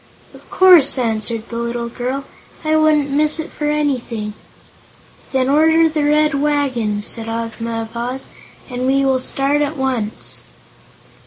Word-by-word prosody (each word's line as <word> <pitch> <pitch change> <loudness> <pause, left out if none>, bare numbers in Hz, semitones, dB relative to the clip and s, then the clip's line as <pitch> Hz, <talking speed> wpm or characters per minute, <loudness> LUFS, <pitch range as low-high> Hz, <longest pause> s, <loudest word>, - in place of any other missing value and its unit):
"Of - - -17
course," 355 -8 +6
answered 225 -1 -2
the 230 - -5
little 235 0 -3
girl; 255 +3 -4 0.4
"I 310 0 +2
wouldn't 305 -2 +3
miss 300 +3 +1
it 320 - -5
for 295 -1 -3
anything." 250 -8 -2 1.0
"Then 260 -2 +1
order 320 +3 +4
the 310 -1 -1
Red 300 +1 +3
Wagon," 255 -8 0
said 225 +1 +1
Ozma 230 0 -3
of 225 +1 -12
Oz, 250 +3 -4 0.4
"and 250 0 -3
we 275 +1 +2
will 265 -1 +2
start 275 +3 0
at 295 +1 -2
once." 255 -5 -3
265 Hz, 145 wpm, -18 LUFS, 235-295 Hz, 1.0 s, course